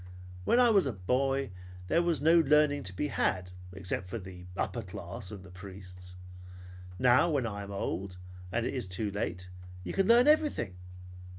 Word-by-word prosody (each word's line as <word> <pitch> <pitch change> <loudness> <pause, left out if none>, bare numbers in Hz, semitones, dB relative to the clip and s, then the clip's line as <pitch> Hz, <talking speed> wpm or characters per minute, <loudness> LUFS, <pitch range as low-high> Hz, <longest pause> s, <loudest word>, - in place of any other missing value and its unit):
When 240 - +4
I 245 -2 +6
was 195 -8 +4
a 130 - -2
boy 135 +6 0 0.4
there 165 - +3
was 170 -4 0
no 165 +2 +6
learning 150 -1 +4
to 95 0 -4
be 150 - -1
had, 90 -8 0 0.2
except 90 0 -3
for 115 - -4
the 90 -3 -10
upper 120 - -2
class 95 +1 -7
and 100 -3 -8
the 90 - -13
priests. 90 -1 -11 0.8
Now 125 - +4
when 140 -6 +1
I 100 -2 -4
am 100 - -8
old 95 -1 -4 0.3
and 115 +3 0
it - - -2
is 125 -7 -2
too 95 +3 -1
late, 90 -2 -4 0.3
you 90 - -5
can 195 - +2
learn 240 +3 +6
everything. 295 - +2
105 Hz, 180 wpm, -30 LUFS, 90-145 Hz, 0.8 s, I